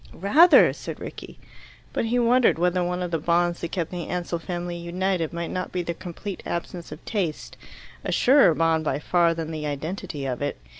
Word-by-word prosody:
"Rather!" 300 - +6
said - - -7
Rickie. - - -9 0.6
But - - 0
he 235 +2 0
wondered 245 -2 +4
whether 180 +1 +1
one 180 +1 -2
of 175 - -4
the 165 - 0
bonds 170 +2 +1
that 170 - -4
kept 170 -4 -2
the 175 -2 -5
Ansell 175 -1 -3
family 175 0 -4
united 175 0 -2
might 170 0 -4
not 185 0 -3
be 180 -1 -2
their 170 - -3
complete 180 +4 -7
absence 170 -1 -5
of 150 - -10
taste 185 -8 -3 0.5
a - - -2
surer 260 - +5
bond 165 0 +2
by 140 -3 0
far 170 +2 +2
than 165 -1 -4
the 155 -1 -4
identity 155 +1 -4
of 130 -1 -3
it. 145 - -2
175 Hz, 195 wpm, -25 LUFS, 165-185 Hz, 0.6 s, Rather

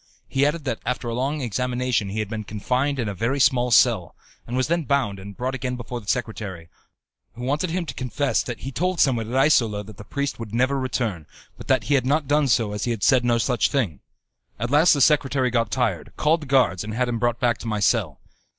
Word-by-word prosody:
He 135 +1 +2
added 155 +1 -2
that 125 -5 -2
after 125 -1 -3
a - - -3
long 135 +5 -1
examination 125 -2 -1
he 100 - -5
had 105 - -3
been 110 +1 -5
confined 125 +7 -1
in 120 -4 -1
a 100 - -3
very 115 +8 -1
small 125 -2 +3
cell, 120 - +3 0.3
and 120 +2 -3
was 130 - +2
then 170 -1 0
bound 125 -9 0
and 100 0 -10
brought 130 +2 -2
again 130 -1 -3
before 120 0 -6
the 105 - -18
secretary, 105 -8 -3 0.7
who 120 - -8
wanted 145 +7 0
him 175 +1 -2
to 140 - -6
confess 130 +2 -1
that 120 -2 -6
he 135 - -5
told 180 +5 -1
someone 115 -5 +2
at 125 - -3
Isola 115 -7 +3
that 105 -1 -13
the - - -9
priest 140 +3 -3
would 115 -1 -6
never 130 +3 +2
return, 115 - -2 0.3
but - - -12
that - - +2
he 145 - 0
had 130 -2 +2
not 145 +1 +1
done 145 0 +3
so 115 -3 +2
as 105 0 -3
he - - -2
had 115 -4 -2
said 130 +2 +4
no 120 -1 +2
such 125 +1 +1
thing. 105 - -1 0.6
At 120 +3 -2
last 155 +4 +6
the 140 - 0
secretary 135 -3 +3
got 115 -2 +1
tired, 110 - -1
called 160 +2 +2
the 150 - -8
guards, 125 -9 +2
and 110 0 -5
had 125 +1 +1
him 120 -1 -2
brought 120 -1 0
back 120 -2 +1
to - - -7
my 105 -2 -1
cell. 100 - +1
125 Hz, 240 wpm, -23 LUFS, 110-135 Hz, 0.7 s, last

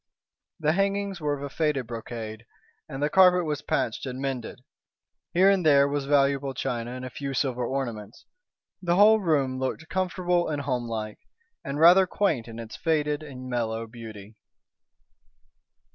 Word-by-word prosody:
The 155 -1 +2
hangings 195 0 -1
were 145 -1 -1
of 140 -1 -7
faded 150 -5 0
brocade, 115 -1 -7 0.4
and 135 +2 -4
the - - +3
carpet 180 -2 +5
was 150 -2 -2
patched 115 0 -2
and 130 0 -5
mended. 130 -3 -4 0.7
Here 190 +3 +5
and 195 -2 +1
there 140 -3 +5
was 140 -1 -2
valuable 140 -1 +2
china 120 -2 -3
and 130 0 -6
a 130 - -7
few 140 +1 -5
silver 125 -2 0
ornaments. 120 -5 -4 0.6
The 175 -1 +1
whole 215 +3 +6
room 140 -8 0
looked 130 +4 -3
comfortable 180 -2 0
and 145 -2 -2
home 125 -3 -2
like, 110 -2 -5 0.4
and 140 +1 -4
rather 180 +4 +7
quaint 165 - 0
in 115 -1 -9
its 115 -1 -8
faded 150 -2 0
and 130 -4 -9
mellow 115 -2 -2
beauty. 110 -2 -11
140 Hz, 155 wpm, -26 LUFS, 120-165 Hz, 0.7 s, rather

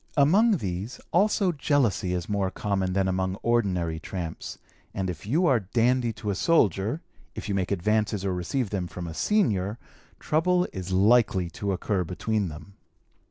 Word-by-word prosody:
Among 195 +10 +5
these 100 - -4
also 195 +1 +3
jealousy 130 - +1
is 90 -2 -3
more 100 -2 0
common 95 -2 -1
than 95 0 +1
amongst 95 +1 -1
ordinary 90 -9 +1
tramps, 85 -1 -6 0.4
and 95 -2 -1
if 85 +3 -10
you 160 - +2
are 130 -7 +4
'dandy' 120 +4 +1
to 105 -1 -4
a - - -2
soldier, 110 - +2 0.3
if - - -6
you 100 - -1
make 95 -2 -1
advances 105 +1 0
or 95 - 0
receive 95 - -2
them 95 -4 -2
from 90 0 -7
a 85 - -6
senior, 105 - +1 0.4
trouble 180 +3 +2
is 95 -1 -5
likely 95 -3 +3
to 100 +6 -3
occur 95 0 -1
between 100 +4 -1
them. 80 +5 -10
100 Hz, 160 wpm, -26 LUFS, 95-120 Hz, 0.4 s, Among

